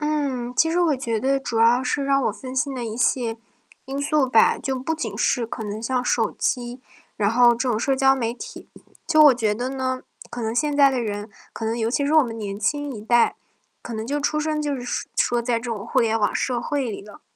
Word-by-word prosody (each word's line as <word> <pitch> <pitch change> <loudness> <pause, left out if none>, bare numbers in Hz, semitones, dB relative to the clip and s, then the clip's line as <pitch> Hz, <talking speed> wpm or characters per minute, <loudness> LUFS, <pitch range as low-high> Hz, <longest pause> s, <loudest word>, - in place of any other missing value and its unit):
嗯， 280 -5 -2
其 325 +4 +3
实 345 - +1
我 330 -5 +3
觉 230 -4 -2
得 270 +3 +1
主 240 -4 -3
要 240 +3 +4
是 275 +2 -1
让 275 -1 +2
我 - - +1
分 260 -1 -9
心 270 +1 0
的 245 -2 -4
一 220 -1 -5
些 240 -2 0 0.5
因 275 +1 -4
素 295 -1 +2
吧， 230 -3 +4
就 265 -1 -3
不 320 +5 -2
仅 225 -9 -5
是 240 0 +1
可 230 - -7
能 210 +1 -5
像 250 +1 0
手 225 -3 +1
机， 245 0 -3 0.4
然 205 -2 +2
后 240 +2 +5
这 240 +2 +1
种 225 - +1
社 270 +3 +1
交 270 0 +4
媒 235 -3 -2
体。 460 - -10 0.4
就 310 -2 +4
我 290 - +8
觉 220 -4 0
得 245 +4 -3
呢， 260 -1 -2 0.3
可 245 - -6
能 225 0 -2
现 295 +2 +1
在 280 -1 +6
的 260 -2 -1
人 205 -1 -4 0.2
可 225 - -6
能 225 +1 -1
尤 225 0 -1
其 285 +3 0
是 290 - 0
我 310 -2 +6
们 230 -2 -6
年 200 -2 -5
轻 290 +6 -1
一 210 - -8
代， 240 +2 +3 0.5
可 235 - -7
能 220 0 -4
就 290 +2 -1
出 305 +1 0
生 305 0 -1
就 290 -1 -1
是 245 0 -3
说 240 0 +2
在 235 0 0
这 - - -14
种 210 -3 -4
互 - - +1
联 225 -1 +2
网 205 - +1
社 245 -2 -1
会 275 -1 -2
里 205 - -6
了。 210 0 -14
250 Hz, 265 characters per minute, -23 LUFS, 230-275 Hz, 0.5 s, 我